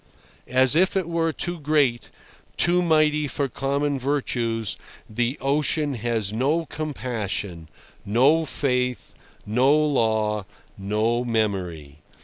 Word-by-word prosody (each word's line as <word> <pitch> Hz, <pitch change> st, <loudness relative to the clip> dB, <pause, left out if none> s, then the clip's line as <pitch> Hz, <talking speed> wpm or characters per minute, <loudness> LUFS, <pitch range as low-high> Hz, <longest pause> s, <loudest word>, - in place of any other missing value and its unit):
As 130 Hz, +2 st, +4 dB
if 185 Hz, +3 st, +3 dB
it 185 Hz, -3 st, -1 dB
were 165 Hz, -1 st, 0 dB
too 175 Hz, +2 st, -3 dB
great, 145 Hz, -5 st, +1 dB, 0.5 s
too 175 Hz, +1 st, +4 dB
mighty 155 Hz, -3 st, +2 dB
for 140 Hz, +1 st, -2 dB
common 140 Hz, +2 st, -1 dB
virtues, 120 Hz, -5 st, -1 dB, 0.3 s
the 120 Hz, +5 st, -1 dB
ocean 145 Hz, +1 st, +1 dB
has 115 Hz, -4 st, -2 dB
no 145 Hz, +8 st, 0 dB
compassion, 110 Hz, -, -4 dB, 0.3 s
no 135 Hz, +10 st, +3 dB
faith, 125 Hz, -3 st, -1 dB, 0.3 s
no 125 Hz, +7 st, +3 dB
law, 110 Hz, -9 st, +1 dB, 0.3 s
no 110 Hz, +4 st, 0 dB
memory. 95 Hz, -11 st, -2 dB
130 Hz, 110 wpm, -24 LUFS, 110-150 Hz, 0.5 s, As